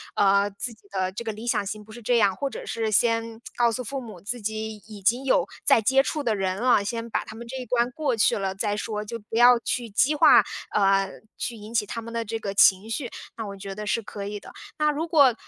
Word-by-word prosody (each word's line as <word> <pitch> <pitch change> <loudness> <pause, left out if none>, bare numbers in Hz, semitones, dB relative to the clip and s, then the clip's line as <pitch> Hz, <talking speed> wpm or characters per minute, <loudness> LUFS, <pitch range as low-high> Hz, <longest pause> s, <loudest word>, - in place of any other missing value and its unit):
呃， 200 0 +4
自 205 +4 -5
己 220 - -23
的 190 -1 -1
这 220 - -5
个 225 - -3
理 220 +3 -8
想 210 -4 +1
型 210 +2 -5
不 215 - -13
是 240 - -10
这 240 +2 +2
样， 200 -4 +3
或 280 +5 -2
者 - - -8
是 225 -1 -2
先 230 +1 +1 0.2
告 235 -1 +3
诉 250 - -3
父 270 +3 -4
母 215 -7 -10
自 225 +7 -4
己 220 +1 -3
已 210 -2 -11
经 235 +7 +2
有 270 - +3 0.2
在 230 - +5
接 265 +5 +4
触 300 - -2
的 230 -6 0
人 190 -1 -1
了， 240 -2 +3
先 230 +2 -4
把 - - -1
他 220 - -10
们 235 +1 -9
这 255 - -7
一 255 - -5
关 240 0 +1
过 270 -3 -1
去 210 - +3
了 195 -1 -2
再 205 +1 -1
说， 210 0 -4
就 230 +3 -5
不 225 +1 -6
要 245 +1 +7
去 240 0 -3
激 255 +8 +3
化， 295 - +7 0.3
呃， 195 -1 +3 0.3
去 235 +1 -3
引 215 +1 -10
起 225 -3 +2
他 230 +3 -5
们 230 +1 -9
的 230 0 -2
这 225 +1 -3
个 205 -3 -4
情 195 +1 +5
绪， 235 +2 -3 0.3
那 225 -2 -4
我 200 - -7
觉 195 0 -7
得 210 +1 -6
是 230 - +1
可 200 -1 -7
以 205 0 -5
的。 - - -12 0.3
那 300 0 +2
如 310 +3 -3
果 285 -7 +5
225 Hz, 280 characters per minute, -25 LUFS, 205-240 Hz, 0.3 s, 要